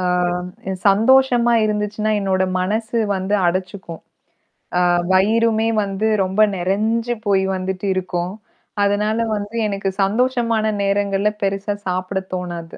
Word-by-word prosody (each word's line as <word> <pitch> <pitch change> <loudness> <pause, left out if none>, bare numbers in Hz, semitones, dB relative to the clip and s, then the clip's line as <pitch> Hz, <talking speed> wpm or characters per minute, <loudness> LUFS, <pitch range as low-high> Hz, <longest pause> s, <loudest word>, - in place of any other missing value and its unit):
ஆ - - -2 0.9
சந்தோஷமா 240 +3 +4
இருந்துச்சுனா, 210 0 -1
என்னோட 190 -1 0 0.2
மனசு 220 +5 -1 0.2
வந்து 190 +2 -1
அடச்சுக்கும். 185 -1 -4 0.8
ஆ - - +3 0.3
வயிறுமே 220 +3 +3 0.2
வந்து 200 +2 -2 0.2
ரொம்ப 190 +3 0
நிறஞ்சு 220 +6 0
போய் 195 -1 +3
வந்துட்டு 190 +1 -3
இருக்கும். 180 -1 -3 0.5
அதனால 210 +2 +1 0.2
வந்து 205 +2 -5
எனக்கு 195 -1 -2
சந்தோஷமான 230 +1 +1 0.2
நேரங்கள்ல 200 0 +1
பெரிசா 195 +1 -1
சாப்பிட 185 +1 -2 0.2
தோணாது. 175 -2 -6
200 Hz, 110 wpm, -20 LUFS, 190-220 Hz, 0.9 s, சந்தோஷமா